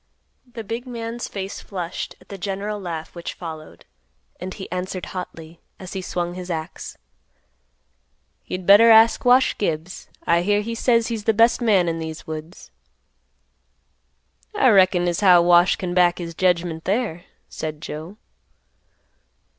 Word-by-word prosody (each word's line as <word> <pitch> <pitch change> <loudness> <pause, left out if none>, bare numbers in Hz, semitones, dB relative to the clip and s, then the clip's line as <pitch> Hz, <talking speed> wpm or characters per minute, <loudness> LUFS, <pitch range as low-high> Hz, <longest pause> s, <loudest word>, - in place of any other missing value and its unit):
The 235 -2 -7
big 230 +4 -5
man's 235 -1 -5
face 195 -1 -6
flushed 180 -3 -6
at - - -22
the 200 - -7
general 200 +2 -3
laugh 165 -3 -6
which 170 -1 -7
followed, 160 -3 -9 0.5
and 185 +1 -6
he 190 0 -9
answered 180 0 -4
hotly, 165 -3 -8 0.2
as 185 -1 -9
he 190 - -4
swung 175 -1 -3
his 180 0 -8
axe, 160 -2 -6 1.5
"You'd 185 0 -5
better 205 +4 +8
ask 225 0 +6
Wash 250 +1 +5
Gibbs; 165 -2 -3 0.2
I 170 0 +3
hear 205 +3 +1
he 230 +2 -4
says 230 0 +2
he's 220 -3 -4
the 225 - +2
best 230 +3 +4
man 200 -7 +3
in 165 0 -2
these 160 -1 -6
woods." 160 +3 -8 1.8
"I 265 -11 +4
reckin 185 -4 +4
as 175 -1 0
how 180 -4 +6
Wash 175 +1 +5
can 180 -2 -4
back 175 -1 +3
his 170 -2 -6
jedgment 170 -2 0
there," 195 -5 -1 0.2
said 155 -1 -6
Joe. 160 +5 -8
185 Hz, 145 wpm, -22 LUFS, 170-210 Hz, 1.8 s, better